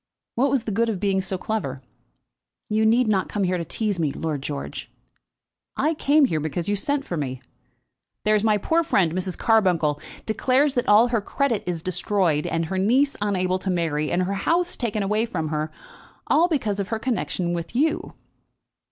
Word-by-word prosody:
What 270 +4 +2
was 265 -3 +1
the 225 - -3
good 230 +3 +1
of 205 -5 -2
being 195 -1 +1
so 190 0 -3
clever?" 140 -11 -3 0.9
"You 220 +1 +2
need 235 +2 +3
not 195 -3 +1
come 205 - -1
here 180 -1 0
to - - -2
tease 205 +3 -2
me, 155 -3 +1
Lord 150 -1 -3
George." 140 0 -6 0.9
"I 315 - +2
came 295 -1 +4
here 160 -11 0
because 155 +3 -3
you 205 - +1
sent 280 +7 -1
for 175 - -4
me. 130 -4 -3 0.9
There's 215 -1 +3
my 215 -1 +3
poor 325 +11 +1
friend, 185 - +2
Mrs. 185 0 -3
Carbuncle, 175 -10 +2 0.2
declares 260 +5 +2
that 245 - 0
all 220 +4 +6
her 230 -3 +1
credit 240 0 0
is 170 -2 -2
destroyed, 185 -4 0
and 165 0 -1
her 190 +3 -2
niece 260 +8 +3
unable 185 -2 0
to 190 - -4
marry, 160 -4 0
and 180 +1 +1
her 190 +2 -2
house 340 - 0
taken 215 -4 -2
away 215 +3 +1
from 160 -7 -3
her, 155 0 -2 0.6
all 325 +4 +4
because 230 - -1
of 195 - -2
her 225 - -2
connexion 220 -7 -1
with 170 +5 -5
you." 305 +5 0
200 Hz, 185 wpm, -24 LUFS, 175-235 Hz, 0.9 s, all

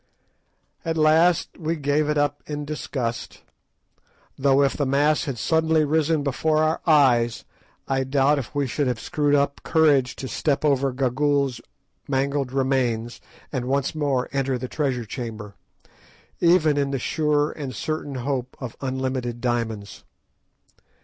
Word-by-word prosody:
At 165 0 -2
last 160 +4 +3
we 165 0 -1
gave 145 0 0
it 150 - +1
up 145 0 0
in 150 -1 -4
disgust; 130 -5 -4 0.9
though, 140 0 +3
if 135 - +1
the 145 - -1
mass 145 +3 +2
had 135 -4 -4
suddenly 160 +4 +2
risen 155 0 +1
before 155 +3 0
our 155 +1 +1
eyes, 125 -7 +3 0.4
I 135 -1 0
doubt 140 +2 +2
if 130 +1 -8
we 145 -1 +1
should 130 +3 -1
have 125 -3 -1
screwed 145 +4 +1
up 140 0 0
courage 145 -6 +3
to 135 - -6
step 145 +2 -1
over 140 -2 +2
Gagool's 135 0 0 0.5
mangled 140 -1 0
remains, 130 -4 -1 0.3
and 130 -4 -2
once 135 +1 0
more 140 -5 0
enter 135 -2 0
the 130 +1 -5
treasure 130 -4 -2
chamber, 110 -3 -6 0.9
even 165 -4 +4
in 140 -1 +1
the 135 - -1
sure 150 +2 0
and 135 -5 -6
certain 150 +2 -4
hope 130 0 -3
of 125 -4 -6
unlimited 130 -2 -2
diamonds. 115 -4 -3
140 Hz, 145 wpm, -24 LUFS, 130-150 Hz, 0.9 s, even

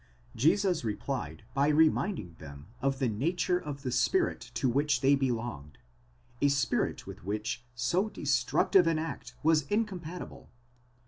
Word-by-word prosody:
Jesus 180 - +2
replied 105 - -4
by 140 +1 +2
reminding 155 - +2
them 70 -1 -10 0.2
of 135 0 +1
the 130 -2 +1
nature 170 - 0
of 145 -4 -7
the 130 - -2
spirit 345 - +2 0.2
to 130 +3 +1
which 140 +1 +1
they 135 +1 +5
belonged, 120 - -2 0.6
a 145 - +5
spirit 140 -2 0
with - - -10
which 105 +4 -3
so 170 - +1
destructive 145 - +2
an 165 -1 +2
act 125 -6 -5
was 155 -1 +4
incompat 185 -5 -2
ible. - - -14
140 Hz, 140 wpm, -30 LUFS, 120-165 Hz, 0.6 s, they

